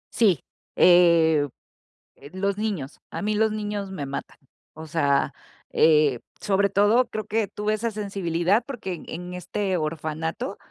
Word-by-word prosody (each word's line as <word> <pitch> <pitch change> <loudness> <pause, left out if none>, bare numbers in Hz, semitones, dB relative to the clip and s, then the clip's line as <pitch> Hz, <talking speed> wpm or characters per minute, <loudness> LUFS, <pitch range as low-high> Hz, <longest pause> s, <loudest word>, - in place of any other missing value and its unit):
Sí, 200 - +4 0.4
em, 165 -4 +5 0.7
eh, 140 +2 -14
los 195 +1 -1
niños. 195 -10 -3
A - - -4
mí 210 +1 0
los 220 +1 +2
niños 205 -2 -4
me 145 -7 -5
matan. 140 - -6 0.4
O 160 0 -9
sea, 145 -3 +1 0.4
eh, 150 -5 +4 0.2
sobre 200 0 +2
todo, 205 +6 +4
creo 215 -1 -4
que 220 -1 0
tuve 210 +2 -1
esa 230 +2 -2
sensibilidad, 195 -1 0
porque 225 -9 -5
en 165 - -9
en 180 +1 -6
este 185 +2 -2
orfanato 160 - -3
190 Hz, 145 wpm, -25 LUFS, 160-210 Hz, 0.7 s, em